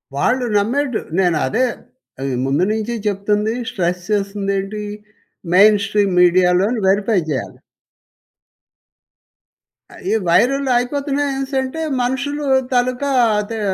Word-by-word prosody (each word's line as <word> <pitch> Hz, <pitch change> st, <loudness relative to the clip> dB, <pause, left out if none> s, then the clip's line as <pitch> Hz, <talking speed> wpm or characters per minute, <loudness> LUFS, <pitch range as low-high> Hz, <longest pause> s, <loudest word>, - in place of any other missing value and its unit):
వాళ్ళు 250 Hz, -, +1 dB
నమ్మేడు 250 Hz, +4 st, 0 dB, 0.2 s
నేనదే 185 Hz, +6 st, +1 dB, 0.6 s
ఆహ్, 135 Hz, -1 st, -2 dB
ముందు 140 Hz, +7 st, +1 dB
నుంచి 220 Hz, +2 st, -2 dB
చెప్తుంది 210 Hz, +2 st, 0 dB, 0.2 s
స్ట్రెస్ 180 Hz, -1 st, -2 dB
చేస్తుందేంటి? 200 Hz, 0 st, -2 dB, 0.7 s
మెయిన్ 210 Hz, +2 st, +6 dB
స్ట్రీమ్ 200 Hz, -2 st, +1 dB
మీడియా‌లోని 180 Hz, +5 st, +3 dB
వెరీఫై 200 Hz, +1 st, +2 dB
చేయాలి. 140 Hz, -4 st, -4 dB, 2.5 s
ఈ -, -, +2 dB
వైరల్ 270 Hz, +10 st, +2 dB
అయిపోతున్నాయనేసి 275 Hz, +1 st, -2 dB
అంటే 290 Hz, +5 st, -5 dB, 0.2 s
మనుషులు 275 Hz, +4 st, -2 dB, 0.3 s
తాలుకా 250 Hz, +3 st, 0 dB, 0.3 s
అదే 220 Hz, +2 st, -6 dB
215 Hz, 90 wpm, -18 LUFS, 195-260 Hz, 2.5 s, మెయిన్